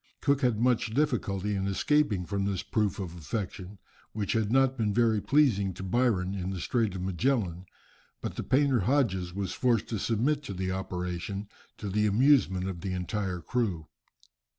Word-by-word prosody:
Cook 140 0 +2
had 120 -5 +2
much 120 -2 +1
difficulty 105 -9 0
in 95 -1 -1
escaping 105 -2 +1
from 100 +1 -1
this 100 -3 -1
proof 105 -3 0
of 90 -4 -5
affection, 95 +2 -5 0.4
which 105 -3 -1
had 110 -2 0
not 135 0 +4
been 105 -5 0
very 115 -3 +3
pleasing 100 - +2
to 95 - -7
Byron 95 -3 +1
in 95 -2 -3
the 95 -1 -4
Strait 110 -2 0
of 90 - -4
Magellan, 95 -2 -1 0.5
but - - -5
the - - -3
painter 135 -1 +2
Hodges 100 -6 +1
was 95 0 -3
forced 120 -5 +1
to 110 - -2
submit 125 +8 +1
to 100 - -5
the 95 0 -2
operation, 95 +2 -4 0.3
to 105 - -6
the 105 +2 +1
amusement 105 -5 +3
of 90 -3 -5
the 95 0 -3
entire 90 0 -3
crew. 95 -6 -1
100 Hz, 175 wpm, -29 LUFS, 95-120 Hz, 0.5 s, not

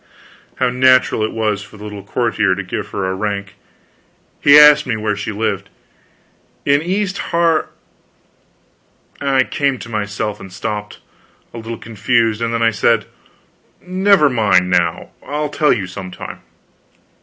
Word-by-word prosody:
How 125 -1 0
natural 130 -2 +3
it 110 - -1
was 110 -2 -1
for 105 +1 -13
the 105 - -11
little 105 -1 -7
courtier 105 -2 0
to 100 - -4
give 90 - -5
her 95 - -4
a 95 - -1
rank. 100 0 -4 0.9
He 145 +1 +7
asked 150 -1 +7
me 115 -3 -1
where 105 -1 -1
she 100 +1 -4
lived. 100 -2 -3 1.0
"In 140 +1 +3
East 195 +3 -2
Har 170 -1 +1 0.8
" - - -35
I 135 -2 +2
came 140 0 -1
to 115 - -10
myself 105 -1 -3
and 95 - -11
stopped, 105 +2 -5 0.5
a - - -8
little 115 0 -6
confused; 115 0 0
then 115 0 -1
I 115 - +4
said, 115 0 +1 0.7
"Never 185 -2 +3
mind, 100 -8 +2
now; 85 -2 0
I'll 150 +1 -3
tell 150 0 +2
you 105 -6 0
some 90 0 -8
time." - - -9
110 Hz, 150 wpm, -17 LUFS, 100-140 Hz, 1.0 s, He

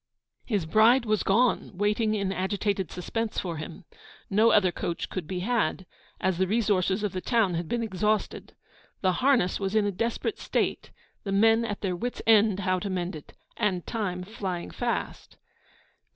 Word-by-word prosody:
His 205 -8 0
bride 225 +8 +5
was 215 -1 +1
gone, 235 +4 +2
waiting 210 +2 +1
in 200 -2 -1
agitated 195 -1 -1
suspense 225 +5 -4
for 170 -3 -4
him. 165 +4 -8 0.5
No 215 +4 +5
other 205 -5 +4
coach 170 0 -4
could 180 -5 -4
be 180 0 -3
had, 200 -4 0 0.3
as 185 -2 0
the 190 - +2
resources 205 -2 +1
of 205 - 0
the 185 - -4
town 225 -6 +2
had 170 -1 -3
been 235 -1 -1
exhausted. 210 0 -1 0.5
The 185 - +3
harness 250 -9 +3
was 195 +1 -2
in 215 -1 +3
a 205 - 0
desperate 230 +5 -2
state, - - -1 0.3
the 195 - -4
men 225 +3 +4
at 210 -3 -4
their 185 -3 -1
wit's 245 +7 -4
end 215 -3 +4
how 185 -1 +1
to 200 - -4
mend 180 -1 -2
it, 150 - -11 0.2
and 185 -4 0
time 185 -6 -3
flying 185 -3 -5
fast. 240 -1 -4
200 Hz, 170 wpm, -27 LUFS, 185-220 Hz, 0.5 s, bride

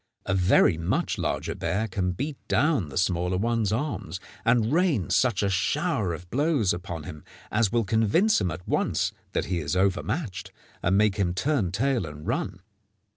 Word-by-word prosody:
A - - 0
very 90 -2 +4
much 85 - -1
larger - - -1
bear 110 +4 -1
can 95 -3 -1
beat 140 - -3
down 130 - +2
the 70 - -6
smaller 90 0 +1
one's 115 0 0
arms, 120 -5 -3 0.2
and 115 +2 +2
rain 165 - +2
such 120 -6 +2
a - - +2
shower 110 - 0
of 85 +2 -7
blows 140 - +2
upon 85 -3 -6
him 75 0 -9 0.3
as 105 -2 +2
will 120 -1 +2
convince 110 - +3
him 90 - +1
at 85 +2 -7
once - - 0 0.2
that - - 0
he 90 -2 -1
is 80 +3 -2
overmatched, 100 - -1 0.3
and 95 +3 +2
make 105 -1 +3
him 90 -3 0
turn 120 - 0
tail 120 -1 0
and 75 0 -9
run. 90 - -2
100 Hz, 175 wpm, -26 LUFS, 90-120 Hz, 0.3 s, very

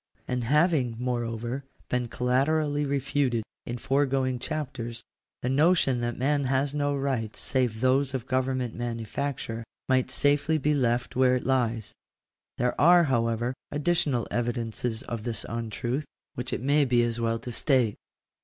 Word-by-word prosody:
And 125 -2 -1
having, 150 -3 +2
moreover, 120 +1 -2 0.2
been 125 -1 -1
collaterally 145 +5 +1
refuted 140 -4 0 0.2
in 120 - -3
foregoing 135 -1 +1
chapters, 130 -6 -4 0.4
the - - 0
notion 140 -3 +3
that 120 0 -2
man 140 +2 +1
has 135 +2 +1
no 145 -1 0
rights 130 -6 -2
save 125 -4 0
those 135 +1 +2
of 125 -2 -3
government 130 -2 -1
manufacture, 115 +1 -3 0.2
might 130 -1 +2
safely 145 +4 +2
be 150 +1 +1
left 125 -3 0
where 130 0 +4
it 125 - -3
lies. 120 -4 0 0.6
There 125 0 +1
are, 175 +3 +7
however, 120 -3 0 0.2
additional 145 -5 +1
evidences 120 -1 -2
of 115 -1 -5
its 115 -2 -2
untruth, 120 +5 -3 0.3
which 125 +1 -4
it - - -2
may 145 +3 +3
be 120 -3 +3
as 120 0 -1
well 115 0 +1
to 120 +2 -7
state. 125 -3 +2
130 Hz, 145 wpm, -27 LUFS, 120-140 Hz, 0.6 s, are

